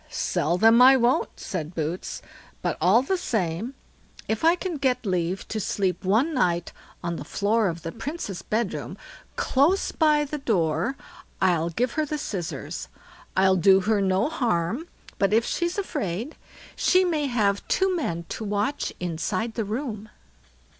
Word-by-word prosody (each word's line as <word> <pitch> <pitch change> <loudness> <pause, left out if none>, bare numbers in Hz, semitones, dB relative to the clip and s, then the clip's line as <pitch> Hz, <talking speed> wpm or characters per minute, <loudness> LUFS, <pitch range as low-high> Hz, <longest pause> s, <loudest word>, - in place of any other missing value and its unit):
sell 170 +4 0
them 225 +4 +6
I 265 +1 +8
won't", 245 +1 +1
said 175 -5 -5
Boots; 160 +3 -4 0.4
"but - - 0
all 195 +9 +5
the 380 +7 0
same, 215 - -2 0.5
if 220 +4 -2
I 330 +2 +6
can 360 -2 -4
get 260 -3 0
leave 180 -1 -1
to 220 - -2
sleep 185 -2 -1
one 225 - +2
night 175 - 0 0.3
on 170 -1 -2
the - - -6
floor 210 +1 +1
of 170 -2 -4
the 165 - -4
Princess' 225 - -5
bedroom, 220 -2 -2 0.4
close 300 +9 +2
by 305 -2 +3
the 295 +1 -5
door, 180 - 0 0.4
I'll 170 -3 +2
give 240 +9 -1
her 310 0 0
the 300 - -2
scissors. 185 - -5 0.5
I'll 190 0 +5
do 190 +2 +5
her 210 +1 +1
no 190 +4 +2
harm, 240 - -1 0.3
but 195 +1 +2
if 230 +1 +4
she's 345 +2 -1
afraid, 230 - -3 0.4
she 370 0 +3
may 310 -5 0
have 205 -5 0
two 380 -1 +2
men 170 - -2
to - - -5
watch 210 +7 -1
inside 185 +6 -2
the 225 -2 -2
room." 215 -1 -4
215 Hz, 155 wpm, -25 LUFS, 180-275 Hz, 0.5 s, I